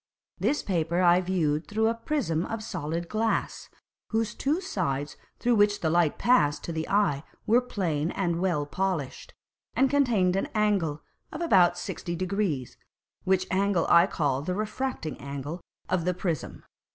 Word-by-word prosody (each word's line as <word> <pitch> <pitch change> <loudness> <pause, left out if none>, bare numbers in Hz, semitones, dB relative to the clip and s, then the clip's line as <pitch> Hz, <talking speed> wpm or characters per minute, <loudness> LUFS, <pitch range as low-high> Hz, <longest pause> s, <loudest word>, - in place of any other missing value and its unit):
This 295 - +1
Paper 170 -2 0
I 175 +1 +5
view'd 165 -4 0
through 220 +2 +1
a 225 - +2
Prism 230 - -1
of 225 -1 -4
solid 170 -3 -4
Glass, 220 +4 -1 0.4
whose 225 -1 0
two 295 +5 0
Sides 150 - -2 0.2
through 245 0 +2
which 205 -1 +3
the 160 - +1
Light 170 -3 +2
passed 235 -13 +3
to 170 - -4
the 160 0 -3
Eye 195 -9 +2 0.2
were 235 +3 +4
plane 170 -10 -1
and 175 -3 -1
well 170 -6 +1
polished, 170 -4 -3 0.4
and 265 0 +3
contained 230 -11 +3
an 195 - -1
Angle 195 -8 +1 0.3
of 305 - -6
about 190 - +4
sixty 170 -1 -4
degrees; 180 - -2 0.5
which 185 0 +2
Angle 195 -2 +2
I 170 +2 +7
call 140 -7 0
the 180 +5 -2
refracting 215 -4 -3
Angle 140 +5 -6 0.3
of 180 -2 0
the 180 -1 +1
Prism. 175 -5 -3
185 Hz, 155 wpm, -27 LUFS, 160-215 Hz, 0.5 s, I